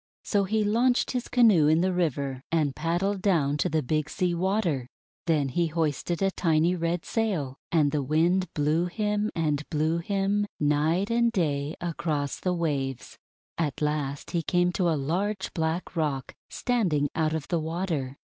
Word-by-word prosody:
So 200 -2 +1
he 215 +2 +1
launched 240 +4 +2
his 250 -1 -2
canoe 215 -11 +5
in 160 +2 +4
the 185 0 +1
river, 140 -7 -1
and 150 -5 +1
pad 165 +3 -1
dled 195 0 0
down 155 -8 +2
to 150 - 0
the 155 -1 0
Big 155 +3 -1
Sea 180 -1 0
Water. 170 - 0 0.4
Then 150 -4 +2
he 170 +6 +1
hoisted 165 +2 -1
a 195 - +2
tiny 165 0 +2
red 170 0 -2
sail, 175 - -1
and 150 -4 +3
the 150 -1 0
Wind 165 +6 +1
blew 155 +4 +1
him, 210 +2 -1
and 150 -3 0
blew 155 +2 +1
him, 200 +3 0
night 155 +7 +1
and 235 0 +3
day, 150 -6 -1
across 155 -4 -2
the 185 - 0
waves. 140 -6 -3 0.4
At 150 -5 -1
last 150 -2 -2
he 170 - 0
came 175 +2 +1
to 180 -1 +1
a 160 - +1
large 190 +8 -2
black 165 +3 -2
rock 145 -5 -1 0.2
standing 180 - +1
out 160 -1 0
of 155 -2 -5
the 170 - +1
water. 160 -5 -3
165 Hz, 170 wpm, -27 LUFS, 150-190 Hz, 0.4 s, canoe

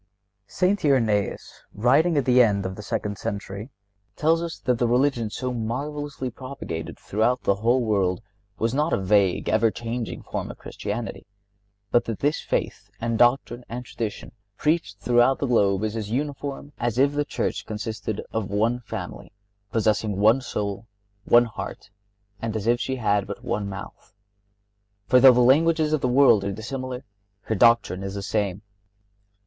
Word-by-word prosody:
St. 190 - +1
Irenaeus, 115 -8 +1
writing 145 +9 +3
at 140 - +2
the 125 0 +6
end 100 -4 +2
of 95 0 -4
the 105 - -8
second 105 -1 -3
century, 100 +3 -5 0.5
tells 165 +2 +2
us 170 -1 -4
that 125 -2 -1
the 120 - +2
religion 125 -2 +2
so 125 +3 -3
marvelously 135 +3 -4
propagated 120 -11 -7
throughout 115 +5 0
the - - +3
whole 120 +4 +2
world 100 -4 +1 0.4
was 115 +2 0
not 150 +4 +1
a - - +3
vague, 95 -1 +2
ever 110 +1 +3
changing 115 +1 -5
form - - -4
of - - -8
Christianity, 105 0 -6 0.6
but 120 - +3
that 115 -3 -3
"this 145 +2 0
faith - - -3
and 115 -1 -1
doctrine 120 0 +2
and 125 +2 -5
tradition 115 -3 -5 0.3
preached 155 - 0
throughout 120 +5 +3
the - - -1
globe 100 -5 +2
is 110 0 -2
as 110 -2 -4
uniform 140 +2 -4
as 120 -1 -1
if 140 +2 +4
the 145 0 +1
Church - - -3
consisted 110 -1 -4
of 110 -3 -2
one 110 +4 +1
family, 120 - -7 0.4
possessing 110 -2 +1
one 110 +6 +4
soul, 105 -3 -4 0.4
one 120 0 +6
heart, 110 -2 -8 0.5
and 115 -1 -3
as 110 -2 -3
if 120 +1 +3
she 130 - -2
had 105 -5 +1
but 100 - -7
one 100 -1 -2
mouth. 100 0 -10 0.9
For, 125 +3 +5
though 130 +1 +9
the 125 0 +3
languages 155 +4 +4
of 155 - +1
the - - +1
world 125 -5 +5
are 100 - -2
dissimilar, 125 +5 -5 0.4
her 110 - -3
doctrine 115 -4 +4
is 95 0 -5
the 100 - -4
same. 100 -1 -1
115 Hz, 165 wpm, -24 LUFS, 105-130 Hz, 0.9 s, though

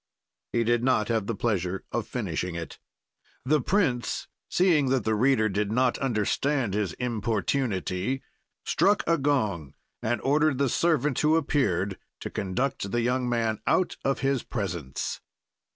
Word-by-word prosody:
"He 115 - +2
did 120 +1 +2
not 125 -5 +2
have 110 -3 0
the 115 - -1
pleasure 95 -4 -1
of - - -2
finishing 90 -1 -3
it. 85 -1 -6 0.7
"The 150 +2 +3
prince, 130 - 0 0.2
seeing 165 -7 +3
that 130 -3 +2
the 110 - +1
reader 110 0 +3
did 105 0 -1
not 125 +1 +2
understand 125 0 0
his 100 -4 -1
importunity, 115 -1 -1 0.4
struck 205 +1 +3
a 165 -2 +2
gong 105 - 0 0.3
and 115 +1 0
ordered 150 0 +2
the 140 -1 +2
servant 150 -3 +1
who 155 +1 +4
appeared 100 - +1 0.2
to - - -5
conduct 100 +2 -2
the 120 +3 0
young 125 +1 0
man 115 -2 0
out 185 - +2
of 135 0 0
his 135 -2 +1
presence. 85 - -4
120 Hz, 145 wpm, -27 LUFS, 105-135 Hz, 0.7 s, who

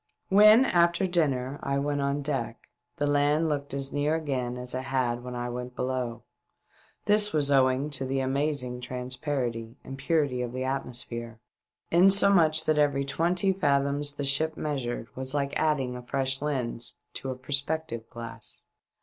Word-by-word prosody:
When, 215 +5 +7
after 170 -1 +3
dining, 145 -7 0
I 140 0 -1
went 145 0 -1
on 140 +1 -1
deck, 130 -5 -3 0.3
the 145 - 0
land 145 +2 +2
looked 145 -2 -2
as 135 0 -3
near 145 +2 +1
again 130 -6 -2
as 125 0 -5
it 130 +1 -3
had 120 -2 -1
when 125 0 -6
I 120 0 -3
went 125 +1 -6
below. 125 -2 -3 0.8
This 210 0 +4
was 145 -2 +2
owing 135 +1 +3
to 135 -1 -4
the 135 +1 -1
amazing 135 -2 -1
transparency 125 -2 -3
and 135 0 -8
purity 145 -4 0
of 120 -1 -4
the 130 0 -3
atmosphere, 120 -3 -3 0.5
insomuch 175 -3 +5
that 155 -1 +2
every 140 -2 +2
twenty 175 +7 +1
fathoms 145 -3 0
the 145 0 -4
ship 155 +3 +1
measured 130 -6 -3
was 130 +2 -3
like 140 -1 -1
adding 135 -5 0
a 125 - -6
fresh 135 +1 -1
lens 130 -5 -3 0.2
to 135 - -4
a 130 - -3
perspective 135 -2 -2
glass. 115 -2 -9
140 Hz, 160 wpm, -27 LUFS, 125-150 Hz, 0.8 s, When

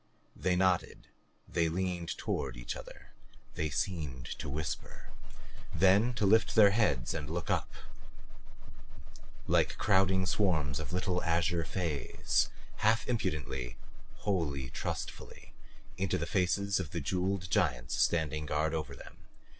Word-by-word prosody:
They 90 0 +1
nodded, 95 -1 +1 0.4
they 85 -1 +1
leaned 90 0 -2
toward 65 -3 -2
each - - -4
other, - - -11 0.4
they 80 0 -1
seemed 70 -5 -2
to - - -4
whisper 75 +2 -5 0.6
then 100 +8 +4
to 110 -3 +1
lift 110 +3 +4
their 105 -3 +8
heads 75 - +1
and 75 -3 -4
look 85 +1 -2
up - - 0 1.7
like - - +2
crowding 95 0 +3
swarms 80 -8 +1
of 80 - -5
little 90 0 0
azure 85 0 +1
fays, 80 -8 0 0.3
half 110 +2 +2
impudently, 75 - -2 0.5
wholly 75 -10 -1
trustfully, - - -6 0.4
into 95 0 0
the 85 - -2
faces 100 +3 +1
of 90 -6 -3
the 85 - -3
jeweled 90 +4 -1
giants - - +1
standing 75 +2 +1
guard 75 +2 0
over 75 -4 -3
them. - - -12
85 Hz, 125 wpm, -32 LUFS, 75-95 Hz, 1.7 s, their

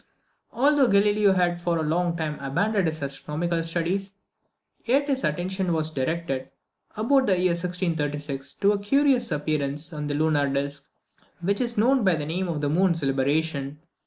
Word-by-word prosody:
Although 280 +2 +3
Galileo 205 -1 +4
had 175 -2 +1
for 175 -1 0
a 160 - -1
long 170 +2 0
time 155 -2 -3
abandoned 180 +8 0
his 155 -2 -3
astronomical 155 +5 -2
studies, 180 +4 -2 0.7
yet 275 +4 +2
his 270 -2 -1
attention 180 +3 -1
was 160 -1 -1
directed, 135 -1 -3 0.5
about 260 +4 +3
the 190 -2 +3
year 180 -1 +3
1636, 150 -6 -3
to 200 - +3
a 205 - 0
curious 255 +1 +2
appearance 150 0 -2
in 150 -1 -4
the 145 - -2
lunar 150 -2 +2
disc, 140 0 -3 0.5
which 200 +5 0
is 235 -2 -2
known 250 +3 +3
by 185 -4 +4
the 150 -2 -3
name 180 +5 -2
of 160 -4 -3
the 145 - 0
moon's 170 0 +2
libration. 140 +1 0
170 Hz, 160 wpm, -25 LUFS, 150-200 Hz, 0.7 s, Galileo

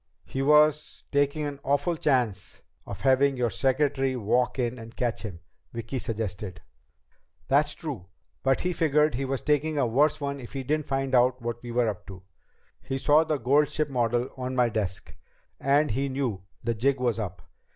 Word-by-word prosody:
"He 135 - -4
was 150 +1 +3
taking 145 +1 +1
an 145 -1 -5
awful 145 +5 +1
chance 125 - -1 0.2
of 100 - -7
having 135 0 +3
your 120 -2 0
secretary 135 +2 +1
walk 125 +3 +1
in 125 -1 -1
and 115 +1 -11
catch 120 -2 -1
him," 90 -7 -7 0.3
Vicki 115 +3 -4
suggested. 105 -5 -4 0.9
"That's 145 +2 +3
true. 130 - -6 0.3
But 135 0 +2
he 180 0 0
figured 150 -2 +2
he 135 +3 -2
was 135 0 -3
taking 150 +1 +1
a 140 - +3
worse 145 +7 +2
one 140 -1 -3
if 120 - -10
he 135 -1 -3
didn't 150 +3 -1
find 135 -1 -1
out 125 0 +4
what 120 0 -4
we 120 - -8
were 120 0 +2
up 105 -4 -4
to. 95 -2 -10 0.6
He 135 - -3
saw 150 +3 +4
the 155 -2 -1
gold 145 +3 +3
ship 155 -1 -1
model 120 -1 0
on 130 0 -3
my 125 -2 +3
desk, 100 -5 -4 0.4
and 140 0 +3
he 135 +5 -1
knew 125 -9 -2 0.2
the 115 0 0
jig 130 +5 +1
was 120 -3 0
up. 90 -6 -5
130 Hz, 180 wpm, -27 LUFS, 115-145 Hz, 0.9 s, out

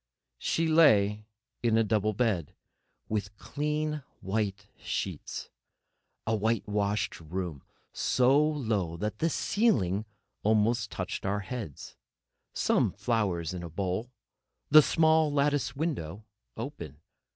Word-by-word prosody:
She 165 0 0
lay 105 -10 +4 0.3
in 115 -2 +3
a 115 - +4
double 110 -1 +1
bed, 105 - 0 0.5
with 105 -1 -3
clean 150 +2 -2 0.2
white 100 -1 -2
sheets. - - -4 0.7
A 110 - +1
white 110 +1 0
washed 105 0 -1
room, 85 -2 -5 0.3
so 130 +3 +3
low 110 - -1
that 105 +4 -3
the 165 - +2
ceiling 110 - +1 0.4
almost 110 0 +2
touched 90 -1 -4
our 100 +1 0
heads, 105 - -7 0.5
some - - +2
flowers 95 -8 -1
in 90 - -5
a 85 - -6
bowl, 95 +7 -2 0.6
the 155 +1 +10
small 160 +1 +3
lattice 145 -1 +1
window 110 - -3 0.3
open. 100 - -6
110 Hz, 115 wpm, -29 LUFS, 95-140 Hz, 0.7 s, the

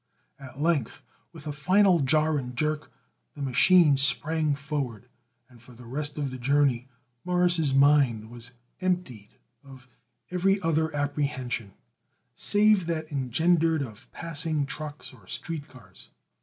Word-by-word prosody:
At 135 -1 -11
length, 145 -4 -1 0.3
with 165 -3 -12
a 150 - -3
final 185 +5 +3
jar 155 +2 +2
and 125 -1 -7
jerk 150 +2 -2 0.4
the 145 - -9
machine 150 +3 +4
sprang 145 +3 +3
forward, 140 -5 -5 0.4
and 125 -3 -19
for 125 0 -16
the 125 +1 -14
rest 145 +5 -4
of 140 -3 -2
the 130 - -7
journey 135 -1 +1 0.4
Morris' 180 -4 +2
mind 135 -6 +3
was 120 0 -10 0.3
emptied 180 - -3 0.3
of 130 -2 -15 0.4
every 195 +2 +1
other 160 -1 +1
apprehension 140 -7 -3 0.6
save 205 -3 +3
that 160 -1 -3
engendered 160 +4 +1
of 110 -5 -11
passing 155 -3 -2
trucks 150 0 -8
or 110 -8 -19
street 160 - -6
cars. 130 -6 -17
145 Hz, 130 wpm, -26 LUFS, 130-160 Hz, 0.6 s, machine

